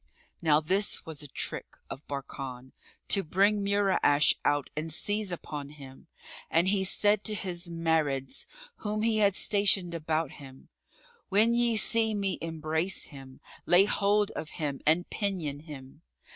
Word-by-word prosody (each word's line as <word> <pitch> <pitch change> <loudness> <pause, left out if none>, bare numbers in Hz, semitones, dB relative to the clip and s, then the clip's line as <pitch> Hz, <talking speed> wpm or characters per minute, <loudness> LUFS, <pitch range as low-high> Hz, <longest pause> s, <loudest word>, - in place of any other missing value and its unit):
Now 155 -3 +4
this 190 +6 0
was 160 -1 -6
a 145 - -7
trick[FN#36] - - -3 0.3
of 140 - -9
Barkan, 135 -2 -7 0.4
to 200 - +4
bring 200 +5 +2
Mura'ash 200 -7 +3
out 145 -2 0
and 155 +2 -3
seize 205 +4 0
upon 150 -4 -6
him, 140 0 -13 0.4
and 170 +3 +2
he 195 -1 +1
said 205 +2 +3
to 215 - +1
his 180 -3 -3
Marids, 160 - -1 0.3
whom 215 0 -3
he 225 -1 +2
had 200 -2 +3
stationed 200 -5 +2
about 160 -2 -2
him, 135 -2 -14 0.6
"When 215 +4 +4
ye 235 -1 +2
see 220 0 +3
me 195 -2 -1
embrace 160 +2 -2
him,[FN#37] 135 -3 -14
lay 180 +3 +6
hold 205 0 +1
of 160 - -6
him 145 -5 -3
and 165 +3 +3
pinion 180 -9 -2
him." 145 -1 -12
170 Hz, 145 wpm, -28 LUFS, 150-200 Hz, 0.6 s, lay